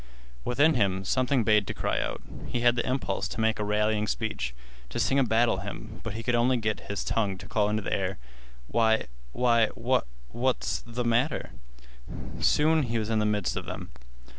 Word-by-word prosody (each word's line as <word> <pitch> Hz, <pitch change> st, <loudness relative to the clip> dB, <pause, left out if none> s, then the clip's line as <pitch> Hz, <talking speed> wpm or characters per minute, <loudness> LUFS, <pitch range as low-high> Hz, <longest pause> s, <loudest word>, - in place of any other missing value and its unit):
Within 145 Hz, +6 st, +4 dB
him 95 Hz, -6 st, +1 dB
something 130 Hz, +2 st, +2 dB
bade 105 Hz, -2 st, +3 dB
to -, -, -4 dB
cry -, -, 0 dB
out. -, -, -4 dB, 0.2 s
He 120 Hz, -, -2 dB
had 120 Hz, 0 st, +5 dB
the 115 Hz, -, 0 dB
impulse 130 Hz, +1 st, -1 dB
to -, -, -6 dB
make 110 Hz, -1 st, +2 dB
a -, -, 0 dB
rallying 105 Hz, +1 st, +1 dB
speech, 85 Hz, -, -2 dB, 0.3 s
to -, -, -4 dB
sing 135 Hz, -, +3 dB
a -, -, +5 dB
battle 115 Hz, -2 st, +3 dB
hymn, 105 Hz, +3 st, -7 dB
but 115 Hz, -, -4 dB
he 115 Hz, -, -5 dB
could 125 Hz, -, 0 dB
only 120 Hz, +2 st, +3 dB
get 110 Hz, -2 st, -1 dB
his 100 Hz, -, -2 dB
tongue 100 Hz, -4 st, 0 dB
to -, -, -10 dB
call 105 Hz, -1 st, +1 dB
into 105 Hz, 0 st, -1 dB
the -, -, -2 dB
air: 95 Hz, -1 st, -1 dB, 0.5 s
"Why—why—what—what's 110 Hz, -, 0 dB
th' 120 Hz, +1 st, -4 dB
matter?" 120 Hz, +6 st, +1 dB, 0.9 s
Soon 155 Hz, +1 st, +4 dB
he 115 Hz, -4 st, -1 dB
was 110 Hz, 0 st, -2 dB
in 110 Hz, -, +2 dB
the 105 Hz, -, +2 dB
midst 105 Hz, -1 st, 0 dB
of -, -, -4 dB
them. -, -, -6 dB
110 Hz, 185 wpm, -28 LUFS, 105-120 Hz, 0.9 s, had